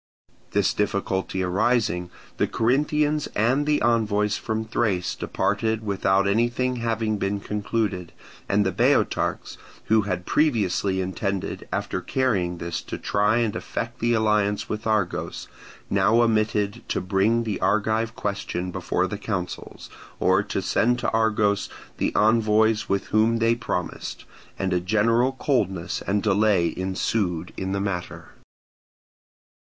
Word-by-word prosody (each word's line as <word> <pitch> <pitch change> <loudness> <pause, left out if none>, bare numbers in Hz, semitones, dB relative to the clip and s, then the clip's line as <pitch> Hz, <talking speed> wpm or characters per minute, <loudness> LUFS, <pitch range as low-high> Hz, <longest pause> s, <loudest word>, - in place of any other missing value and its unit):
This - - +1
difficulty 95 -2 -1
arising, 90 -2 +1 0.3
the - - +2
Corinthians 150 +5 +1
and 130 +7 +2
the 150 -1 +3
envoys 105 -3 +2
from 110 -1 -3
Thrace 100 -6 0
departed 110 +1 -1
without 100 -1 +2
anything 120 +4 +1
having 115 -2 -1
been 100 +1 -1
concluded; 105 -3 -2 0.4
and 100 +1 +3
the 95 - +1
Boeotarchs, - - +1 0.3
who 110 0 +4
had 90 -3 -3
previously 100 - +1
intended 95 +1 -3
after - - -2
carrying 100 -10 0
this 85 0 -4
to - - -6
try 105 +2 +1
and 115 -3 0
effect 115 +1 -4
the 120 +1 +2
alliance 105 -2 +1
with 110 +1 -4
Argos, 105 -5 -1 0.4
now 115 +2 +3
omitted 110 -2 +1
to - - 0
bring 100 +5 +1
the 110 -3 -3
Argive 110 +2 +1
question 95 -3 -3
before 90 +1 -1
the 100 +1 -5
councils, 95 -4 -5 0.3
or - - +3
to - - -3
send 120 +2 +2
to - - -1
Argos 110 -2 +1 0.3
the - - 0
envoys 110 0 +3 0.2
whom 110 +2 +3
they 115 0 +2
had 115 0 +1
promised; 90 - -4 0.3
and 95 -1 -1
a 90 - +2
general 115 +7 +2
coldness 100 - -1
and 100 +1 +1
delay 100 -4 +2
ensued 95 -2 -1
in 95 0 -3
the 100 - -1
matter. 95 -3 -4
105 Hz, 130 wpm, -24 LUFS, 95-115 Hz, 0.4 s, who